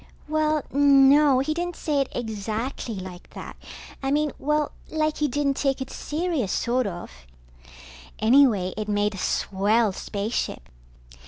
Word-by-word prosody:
Well, 310 -1 +1
no, 280 0 +5
he 310 +3 -1
didn't 350 +1 -3
say 290 -3 0
it 270 - -1
exactly 225 +1 -4
like 185 -2 -9
that. - - -8 0.5
I 270 - -1
mean, 295 +1 +1
well, 300 +1 0 0.2
like 310 -1 0
he 300 - +1
didn't 280 0 0
take 275 -2 0
it 265 - -6
serious, 310 - -2
sort 250 0 0
of. 175 - -7 1.1
Anyway, 220 -5 +4
it 215 0 -4
made 205 0 +1
a 195 - -7
swell 205 +4 +1
spaceship. 200 - -4
265 Hz, 140 wpm, -25 LUFS, 210-295 Hz, 1.1 s, no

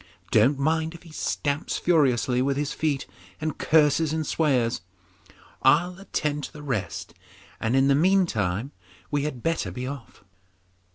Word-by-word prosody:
Don't 120 +6 +4
mind 160 +3 0
if 170 - -13
he 165 - -14
stamps 145 -1 -2
furiously 130 -7 +2
with 135 +1 0
his 145 0 -1
feet 145 -4 -1 0.3
and 155 -2 -3
curses 155 0 +3
and 160 0 -1
swears. 130 - +1 0.8
I'll 175 +7 +3
attend 150 -6 -2
to - - -11
the 150 -1 -10
rest, 130 -9 -3 0.5
and 115 +3 0
in 135 0 +4
the 140 - +5
meantime 140 - +1 0.4
we 145 -1 0
had 130 -6 -5
better 165 - 0
be 125 +8 -5
off. 130 -6 -8
145 Hz, 150 wpm, -25 LUFS, 130-160 Hz, 0.8 s, the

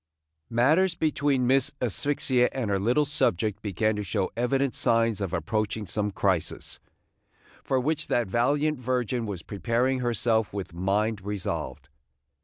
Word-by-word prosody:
MATTERS 155 +10 +3
between 145 -5 +1
Miss 130 +1 +3
Asphyxia 125 +1 +1
and 120 -6 -2
her 100 - +1
little 125 +9 +2
subject 110 - 0
began 110 +2 0
to 105 - -2
show 100 -1 -1
evident 135 +3 +1
signs 115 -2 +2
of 95 -4 -2
approaching 110 +2 -2
some 105 +3 -1
crisis, 95 -3 -1 0.8
for 130 - +1
which 150 +3 -1
that 120 - +1
valiant 140 +8 +1
virgin 125 -2 -1
was 95 -5 -5
preparing 115 +7 0
herself 115 -3 +1
with 95 -3 -5
mind 100 +4 0
resolved. 100 -7 -4
115 Hz, 135 wpm, -27 LUFS, 105-130 Hz, 0.8 s, MATTERS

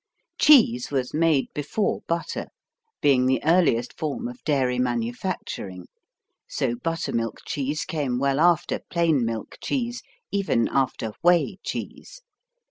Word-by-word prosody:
Cheese 225 - +6
was 130 -3 -2
made 155 -3 +2
before 150 +8 -1
butter, 170 0 -2 0.6
being 130 -3 +4
the 130 -2 +2
earliest 160 -8 +2
form 160 - -2
of 245 0 -10
dairy 130 -4 +1
manufacturing, 120 - -3 0.6
so 120 - -1
buttermilk 120 -5 -3
cheese 145 +2 -2
came 140 -6 -2
well 140 +1 +1
after 170 -1 +3
plain 165 -7 +2
milk 115 -2 -4
cheese, 240 -3 -2 0.3
even 195 -12 +1
after 130 -4 0
whey 175 +1 +3
cheese. - - -7
145 Hz, 120 wpm, -24 LUFS, 125-170 Hz, 0.6 s, Cheese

